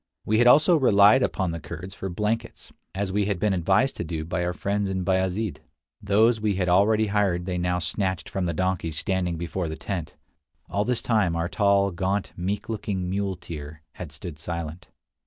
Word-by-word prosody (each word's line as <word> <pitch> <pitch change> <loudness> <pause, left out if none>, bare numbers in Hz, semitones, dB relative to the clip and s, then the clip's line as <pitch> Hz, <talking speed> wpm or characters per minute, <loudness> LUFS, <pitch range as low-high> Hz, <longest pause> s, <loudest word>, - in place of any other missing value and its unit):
We 110 +1 +2
had 120 - +5
also 155 +7 +6
relied 105 -2 +6
upon 95 -7 0
the 85 - -4
Kurds 85 +4 -8
for 95 - -5
blankets, 110 +5 -3 0.2
as 100 0 -2
we 100 +1 +1
had 100 -2 -1
been 105 +2 +1
advised 95 +8 +2
to - - -2
do 80 -1 -4
by 90 +2 -2
our 90 - 0
friends 100 +2 -1
in 95 -1 -2
Bayazid. 95 +2 0 0.4
Those 110 +3 +3
we 105 -2 +1
had 90 -1 0
already 105 +5 +4
hired 100 -4 0
they 90 -1 -2
now 90 0 0
snatched 95 0 -2
from 95 -2 -2
the 85 - -1
donkeys 90 -3 -1
standing 90 -3 -1
before 85 +1 -3
the 80 - -4
tent. 85 -6 -5 0.5
All 100 +1 -1
this 125 -1 0
time 105 -8 +2
our 85 0 -1
tall, 100 0 +2
gaunt, 95 +3 -2
meek 100 +4 -3
looking 100 -5 -3
muleteer 85 -6 -5
had 85 -5 -8
stood 75 0 -8
silent. 85 0 -5
95 Hz, 190 wpm, -25 LUFS, 85-105 Hz, 0.5 s, also